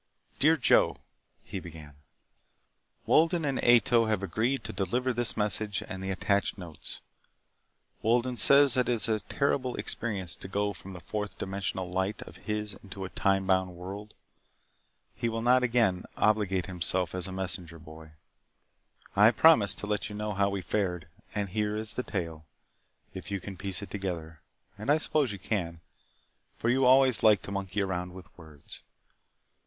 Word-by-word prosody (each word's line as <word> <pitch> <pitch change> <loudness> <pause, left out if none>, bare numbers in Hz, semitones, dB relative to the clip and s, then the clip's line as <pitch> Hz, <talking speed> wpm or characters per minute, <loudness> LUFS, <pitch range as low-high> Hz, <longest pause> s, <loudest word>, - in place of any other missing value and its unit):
Dear 160 +3 +5
Joe: 135 - +4 0.5
(he 95 - -6
began) 80 -4 -11 1.1
Wolden 165 0 +3
and 135 -2 -1
Ato 120 -1 +5
have 105 -3 0
agreed 115 +9 -1
to - - -6
deliver 120 +7 -1
this 120 0 0
message 105 -1 0
and 95 0 -6
the 95 - -3
attached 100 +2 0
notes. 85 -6 -9 1.0
Wolden 120 +3 +1
says 140 +4 +5
that 125 0 +1
it - - +3
is 115 0 +1
a 110 -1 +1
terrible 130 +3 -1
experience 95 -7 -3
to - - -9
go 100 +1 -1
from 95 +1 -11
the 90 - -9
fourth 105 +1 -5
dimensional 95 -1 -3
light 95 +3 -2
of - - -13
his 105 -1 -2
into 95 -1 -7
a - - -6
time 95 0 +1
bound 95 -1 +1
world. 100 +4 -8 1.0
He 115 - -2
will 115 0 -3
not 125 +1 +5
again 115 -7 +1
obligate 100 -4 +2
himself 90 -1 0
as 90 0 -2
a - - -7
messenger 90 -3 -3
boy. 80 -1 -13 1.0
I 105 +2 +7
promised 120 -3 +5
to - - -4
let 105 +1 -2
you 105 - -7
know 105 0 -3
how 100 +1 +2
we 100 -2 -3
fared. 90 -6 -2 0.3
And 100 -2 -1
here 105 +2 -1
is 110 0 0
the - - -2
tale, 85 - -5 0.7
if 95 - -8
you 100 -1 -2
can 95 +2 -8
piece 95 +1 -3
it - - -10
together. 85 -5 -5 0.4
And 105 - -5
I 150 - +5
suppose 150 -5 +1
you 100 - -5
can, 90 -4 -3 0.8
for 115 - -1
you 130 +2 +3
always 130 -2 +5
liked 105 -4 +5
to - - -7
monkey 100 +1 -2
around 90 -1 -3
with 95 -1 -13
words. 80 -4 -11
100 Hz, 170 wpm, -29 LUFS, 95-115 Hz, 1.1 s, I